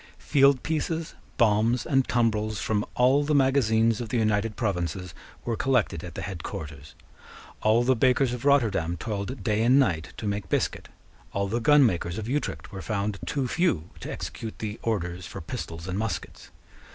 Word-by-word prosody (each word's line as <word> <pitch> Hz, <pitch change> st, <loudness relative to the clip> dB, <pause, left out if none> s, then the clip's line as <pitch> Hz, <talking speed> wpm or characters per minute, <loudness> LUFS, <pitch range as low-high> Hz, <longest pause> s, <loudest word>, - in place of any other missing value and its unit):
Field 140 Hz, -2 st, +3 dB
pieces, 160 Hz, +1 st, -2 dB, 0.2 s
bombs, 115 Hz, +1 st, +3 dB
and 135 Hz, -4 st, +2 dB
tumbrels 110 Hz, -2 st, +1 dB
from 105 Hz, -1 st, 0 dB
all 130 Hz, +4 st, +4 dB
the 150 Hz, +1 st, +1 dB
magazines 115 Hz, -5 st, +3 dB
of 115 Hz, -, -5 dB
the 120 Hz, -, 0 dB
United 110 Hz, -1 st, +1 dB
Provinces 90 Hz, -4 st, -2 dB, 0.3 s
were 115 Hz, -, 0 dB
collected 120 Hz, -11 st, +1 dB
at 85 Hz, -3 st, -8 dB
the -, -, -4 dB
head 95 Hz, -5 st, -5 dB
quarters. 75 Hz, -2 st, -8 dB, 0.7 s
All 110 Hz, +2 st, +4 dB
the 130 Hz, +1 st, +3 dB
bakers 125 Hz, +1 st, +3 dB
of 125 Hz, -, -5 dB
Rotterdam 110 Hz, -, +2 dB
toiled 105 Hz, +5 st, -4 dB
day 105 Hz, -1 st, +1 dB
and 125 Hz, +4 st, +5 dB
night 85 Hz, -, +1 dB
to -, -, -6 dB
make 100 Hz, -2 st, -2 dB
biscuit. -, -, -1 dB, 0.4 s
All 100 Hz, 0 st, 0 dB
the 115 Hz, +4 st, -1 dB
gunmakers 115 Hz, -, +3 dB
of 110 Hz, -1 st, -4 dB
Utrecht 145 Hz, +4 st, -3 dB
were 95 Hz, -2 st, -6 dB
found 100 Hz, -1 st, -2 dB
too 135 Hz, -3 st, -1 dB
few 120 Hz, -, 0 dB
to -, -, -6 dB
execute 110 Hz, -1 st, -6 dB
the 110 Hz, 0 st, -5 dB
orders 90 Hz, -5 st, -2 dB
for -, -, -7 dB
pistols 85 Hz, +1 st, -6 dB
and 95 Hz, +2 st, -2 dB
muskets. 105 Hz, -7 st, -4 dB
110 Hz, 170 wpm, -26 LUFS, 100-130 Hz, 0.7 s, and